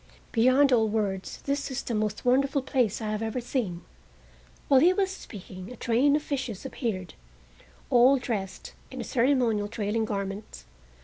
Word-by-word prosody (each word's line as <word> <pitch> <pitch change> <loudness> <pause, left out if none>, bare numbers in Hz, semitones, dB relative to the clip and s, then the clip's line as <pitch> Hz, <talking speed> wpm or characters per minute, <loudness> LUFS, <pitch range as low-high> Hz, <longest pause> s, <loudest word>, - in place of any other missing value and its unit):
Beyond 255 +4 +4
all 225 -2 +4
words, 200 -3 -2
this 280 0 -2
is 265 0 -4
the 235 - -4
most 215 0 -2
wonderful 270 +2 +2
place 245 -6 0
I 215 - -2
have 215 0 -2
ever 225 +2 -2
seen." 230 -8 -3 0.8
While 270 -2 +6
he 350 +6 +5
was 385 0 0
speaking 190 - -9
a - - -8
train 250 +5 +2
of 300 - -1
fishes 265 -7 -4
appeared, 200 - -4 0.8
all 250 +3 +6
dressed 215 -7 -4 0.2
in - - -6
ceremonial, 240 -5 +2
trailing 220 +1 -1
garments. 200 - -5
235 Hz, 150 wpm, -27 LUFS, 210-270 Hz, 0.8 s, While